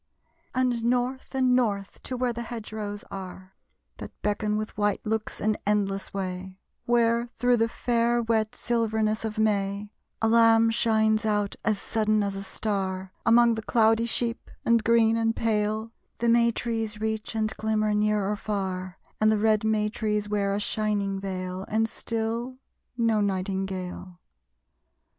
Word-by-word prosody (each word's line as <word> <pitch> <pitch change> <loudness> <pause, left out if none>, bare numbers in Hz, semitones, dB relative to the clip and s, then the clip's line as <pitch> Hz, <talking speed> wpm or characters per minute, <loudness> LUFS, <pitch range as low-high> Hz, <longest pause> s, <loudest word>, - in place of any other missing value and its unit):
And 250 -2 +1
north 250 +3 -1
and 255 -1 +3
north, 205 -6 -1
to 255 - -3
where 245 -1 0
the 235 - -5
hedge 230 -2 -7
rows 205 -1 -5
are, 190 0 -8 0.4
That - - -10
beckon 210 0 0
with 215 0 -4
white 205 -1 0
looks 220 0 -2
an 215 0 +1
endless 195 -2 0
way; 185 -1 -5 0.3
Where, 235 0 +2
through 245 +1 +3
the 225 0 +2
fair 235 0 +1
wet 220 -1 0
silverness 220 -2 0
of 220 -1 -4
May, 205 -1 0 0.3
A 225 - +2
lamb 225 0 +5
shines 220 -1 +2
out 210 -2 0
as 215 -3 +1
sudden 215 -1 +1
as 200 -1 -2
a 195 - -4
star, 190 -2 -3
Among 235 0 +6
the 220 - -3
cloudy 225 +1 +3
sheep; 235 0 -1 0.2
and 230 -1 +4
green, 230 -1 +4
and 225 0 +1
pale, 215 0 0 0.3
The 235 - +1
may 235 0 +5
trees 225 -2 -3
reach 220 0 -3
and 215 -1 0
glimmer, 215 -1 +1
near 210 -1 +1
or 210 - 0
far, 190 -3 -3 0.2
And 215 0 +4
the 215 - +2
red 215 0 +2
may 215 -1 +2
trees 210 -1 -1
wear 200 -1 0
a - - -1
shining 205 -2 -1
veil. 185 -1 -4
And 225 +1 +1
still, 230 +3 -3 0.4
no 225 -3 +2
nightingale! 190 -2 -3
215 Hz, 155 wpm, -26 LUFS, 205-230 Hz, 0.4 s, Among